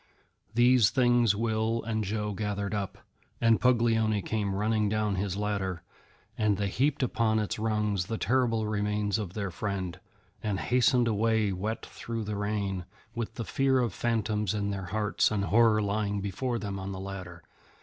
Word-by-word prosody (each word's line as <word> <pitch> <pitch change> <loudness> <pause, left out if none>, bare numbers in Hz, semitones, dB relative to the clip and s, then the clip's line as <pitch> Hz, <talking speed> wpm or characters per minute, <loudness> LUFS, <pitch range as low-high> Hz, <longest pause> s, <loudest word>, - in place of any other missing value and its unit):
These 120 -2 +5
things 120 -5 +3
Will 110 +1 0
and 110 -1 -1
Joe 105 +1 -2
gathered 100 0 -2
up, 100 -2 -3 0.4
and 115 -1 +3
Puglioni 115 -4 +3
came 105 -3 -1
running 105 +1 +1
down 105 -1 0
his 95 0 -2
ladder, 100 -4 -2 0.5
and 105 -3 +1
they 100 0 -1
heaped 135 +6 +1
upon 115 -3 +1
its 105 0 -2
rungs 105 -4 0
the 115 - -2
terrible 120 -3 +1
remains 105 0 0
of 95 -4 -5
their 100 -3 -2
friend, 95 -1 -3 0.4
and 105 -3 -1
hastened 125 0 +3
away 110 -1 +2
wet 110 +5 -3
through 115 0 -6
with - - -5
the 105 - -2
rain, 100 -3 -2 0.3
with 115 -1 -4
the 115 - -4
fear 135 -1 +2
of 120 -6 +1
phantoms 110 -3 0
in 100 -1 -1
their 95 -1 -4
hearts 105 +3 +1
and 100 -2 -1
horror 110 0 +4
lying 100 0 -1
before 115 +5 -2
them 100 -2 -4
on 95 +1 -5
the 95 - -6
ladder. 90 -3 -7
105 Hz, 170 wpm, -29 LUFS, 100-115 Hz, 0.5 s, These